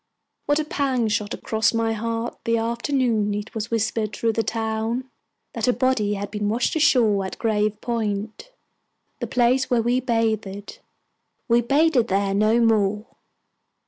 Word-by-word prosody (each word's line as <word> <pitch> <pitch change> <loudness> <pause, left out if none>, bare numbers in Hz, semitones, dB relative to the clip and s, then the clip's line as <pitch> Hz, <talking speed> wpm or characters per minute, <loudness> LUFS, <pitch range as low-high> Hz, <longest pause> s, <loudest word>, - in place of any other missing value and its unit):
What 290 - +3
a 310 - -1
pang 265 -6 0
shot 210 0 -1
across 220 +1 0
my 225 0 +1
heart 230 +1 -3
the 230 0 +2
afternoon 230 -2 0
it 210 +1 -6
was 220 0 -4
whispered 220 -1 -1
through 230 -1 0
the 225 - +1
town 225 +3 -2 0.5
that - - -2
a 250 - +4
body 235 -4 +1
had 200 0 -5
been 210 -1 -2
washed 235 +8 0
ashore 235 -10 +3
at 190 - -6
Grave 215 -2 0
Point 220 - -3 0.7
the - - -3
place 255 +1 +2
where 240 -3 +2
we 245 +2 +2
bathed. 220 -5 -2 0.7
We 235 0 +4
bathed 280 0 +2
there 195 0 0
no 215 +3 +3
more! 210 -2 +2
225 Hz, 150 wpm, -23 LUFS, 210-240 Hz, 0.7 s, a